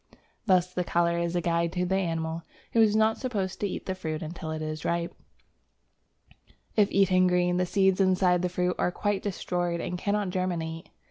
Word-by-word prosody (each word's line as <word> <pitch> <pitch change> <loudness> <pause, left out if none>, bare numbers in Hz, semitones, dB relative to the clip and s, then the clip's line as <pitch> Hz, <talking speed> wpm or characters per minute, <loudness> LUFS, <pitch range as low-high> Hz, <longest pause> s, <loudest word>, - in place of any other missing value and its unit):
Thus 180 -2 +3
the 180 - 0
colour 170 0 +1
is 170 0 -1
a 175 - +1
guide 170 0 0
to 180 -1 0
the 185 - -1
animal, 165 -3 -1 0.3
who 230 - +5
is 215 -1 +4
not 220 0 +3
supposed 200 -8 -3
to 205 - 0
eat - - -5
the 190 - -2
fruit 160 -4 -4
until 160 0 -6
it 155 0 -3
is 155 0 -4
ripe; 170 0 -1 1.6
if 205 -2 +4
eaten 185 -2 +4
green, 180 0 +2
the 180 0 +1
seeds 190 0 +3
inside 185 -2 +3
the 180 - 0
fruit 180 0 0
are 180 - +1
quite 205 +1 -1
destroyed 175 -3 -2
and 180 +1 -4
cannot 200 -1 0
germinate. 170 -3 -3
180 Hz, 190 wpm, -27 LUFS, 170-190 Hz, 1.6 s, who